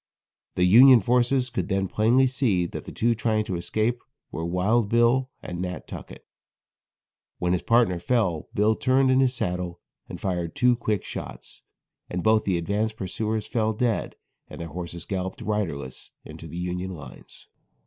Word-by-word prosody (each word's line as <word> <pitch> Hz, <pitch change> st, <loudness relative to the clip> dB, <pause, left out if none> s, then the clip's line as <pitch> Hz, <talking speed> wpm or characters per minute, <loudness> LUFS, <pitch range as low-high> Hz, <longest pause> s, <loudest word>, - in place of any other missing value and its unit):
The 90 Hz, -, +2 dB
Union 120 Hz, +7 st, +8 dB
forces 125 Hz, +3 st, +1 dB
could 95 Hz, -7 st, -2 dB
then 95 Hz, 0 st, 0 dB
plainly 115 Hz, +7 st, +3 dB
see 125 Hz, -9 st, +1 dB
that -, -, -7 dB
the -, -, -8 dB
two 115 Hz, +1 st, +1 dB
trying 110 Hz, -1 st, 0 dB
to 95 Hz, -, -3 dB
escape 110 Hz, +8 st, -1 dB, 0.3 s
were 80 Hz, -, -4 dB
Wild 100 Hz, +6 st, +1 dB
Bill 120 Hz, +3 st, +3 dB
and 90 Hz, 0 st, -5 dB
Nat. 90 Hz, 0 st, -5 dB
Tuckett. -, -, -10 dB, 1.1 s
When 90 Hz, 0 st, 0 dB
his 90 Hz, -, 0 dB
partner 115 Hz, -7 st, +2 dB
fell, 90 Hz, -5 st, 0 dB
Bill 105 Hz, +2 st, +3 dB
turned 130 Hz, +2 st, +3 dB
in 130 Hz, -, +4 dB
his 130 Hz, -1 st, +2 dB
saddle 90 Hz, -6 st, -3 dB, 0.3 s
and -, -, -7 dB
fired 90 Hz, -4 st, -3 dB
two 125 Hz, 0 st, +4 dB
quick 110 Hz, -4 st, -2 dB
shots, -, -, -8 dB, 0.5 s
and 90 Hz, 0 st, -3 dB
both 110 Hz, 0 st, +3 dB
the 95 Hz, -3 st, +1 dB
advanced 105 Hz, +5 st, -1 dB
pursuers 110 Hz, +3 st, -3 dB
fell 110 Hz, -2 st, 0 dB
dead 115 Hz, 0 st, -1 dB, 0.3 s
and -, -, -10 dB
their 85 Hz, -1 st, -6 dB
horses 85 Hz, +1 st, -7 dB
galloped 95 Hz, -1 st, -4 dB
riderless 80 Hz, -12 st, -3 dB, 0.2 s
into -, -, -10 dB
the 85 Hz, -, -8 dB
Union 90 Hz, +1 st, -3 dB
lines. 70 Hz, -5 st, -12 dB
105 Hz, 165 wpm, -25 LUFS, 90-120 Hz, 1.1 s, Union